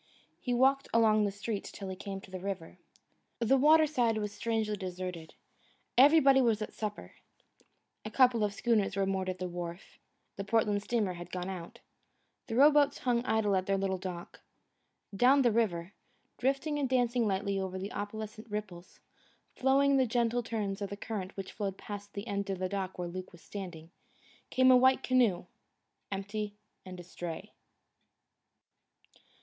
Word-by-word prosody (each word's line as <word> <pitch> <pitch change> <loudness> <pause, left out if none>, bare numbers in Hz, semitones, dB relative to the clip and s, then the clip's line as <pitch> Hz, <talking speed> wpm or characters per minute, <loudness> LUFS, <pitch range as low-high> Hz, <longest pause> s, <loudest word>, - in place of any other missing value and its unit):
He 250 - -3
walked 265 +3 +3
along 215 -2 +4
the 200 - -1
street 205 +1 -4
till 195 - -8
he 190 - -4
came 195 0 -6
to 190 - -15
the 185 - -5
river. 185 -3 -6 0.6
The 235 +3 +3
water 310 +4 +6
side 245 -7 +1
was 210 -1 -2
strangely 220 0 -1
deserted. 180 -3 -6 0.6
Everybody 275 0 +6
was 230 -4 +2
at 215 - -5
supper. 210 -1 -5 0.9
A 215 - -5
couple 245 -1 +4
of 205 - +1
schooners 205 -1 +1
were 195 -1 +1
moored 190 -1 -1
at 185 - -3
the 185 0 -3
wharf. 175 0 -7 0.4
The 200 - -3
Portland 210 -1 +1
steamer 210 -3 0
had 175 0 -9
gone 180 0 -4
out. 175 -3 -8 0.7
The 225 - -3
row 285 +5 +7
boats 290 -1 +3
hung 240 -2 0
idle 220 -3 +2
at 185 0 0
their 195 0 +2
little 190 -1 -1
dock. 180 -2 -7 0.7
Down 265 +6 +5
the 240 - +4
river, 195 -5 0 0.5
drifting 275 +3 0
and 270 -3 0
dancing 245 -2 +2
lightly 200 0 -1
over 190 -1 -3
the 195 +2 -5
opalescent 215 +2 -6
ripples, 200 -4 -7 0.5
following 275 +1 +3
the 260 -1 +3
gentle 235 +1 +1
turns 210 -4 -3
of 200 - -3
the 200 - -6
current 205 -4 -5
which 195 -1 -5
flowed 195 -3 -4
past 205 0 -8
the 200 - -4
end 200 0 -3
of 195 - -1
the 185 0 -1
dock 190 -1 -4
where 175 -1 -3
Luke 185 +1 -7
was 175 - -16
standing, 175 -5 -8 0.6
came 260 0 +5
a - - +8
white 260 +1 +5
canoe, 240 -9 +2 0.7
empty 205 +1 -4 0.3
and 185 -1 -8
astray. 175 -1 -7
205 Hz, 165 wpm, -31 LUFS, 190-240 Hz, 0.9 s, a